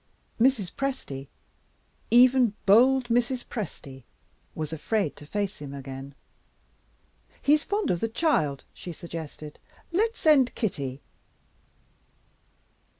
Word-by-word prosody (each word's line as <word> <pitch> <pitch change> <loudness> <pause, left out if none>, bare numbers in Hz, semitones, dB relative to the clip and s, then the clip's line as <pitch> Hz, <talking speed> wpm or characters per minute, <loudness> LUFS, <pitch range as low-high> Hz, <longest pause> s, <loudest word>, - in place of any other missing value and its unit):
Mrs. 230 -6 +3
Presty 255 - -4 0.8
even 245 -2 +5
bold 250 +5 +5
Mrs. 245 +1 +1
Presty 140 - -7 0.5
was 155 0 -4
afraid 160 +2 -1
to 150 - -12
face 205 +2 -3
him 140 -1 -7
again. 135 0 -8 1.2
"He's 295 +2 +3
fond 410 +1 0
of 175 - 0
the 225 - 0
child," 190 - +1
she 175 - -8
suggested; 160 -2 -8 0.3
"let's 445 +6 +1
send 285 -5 +4
Kitty." 140 - -3
210 Hz, 100 wpm, -27 LUFS, -, 1.2 s, even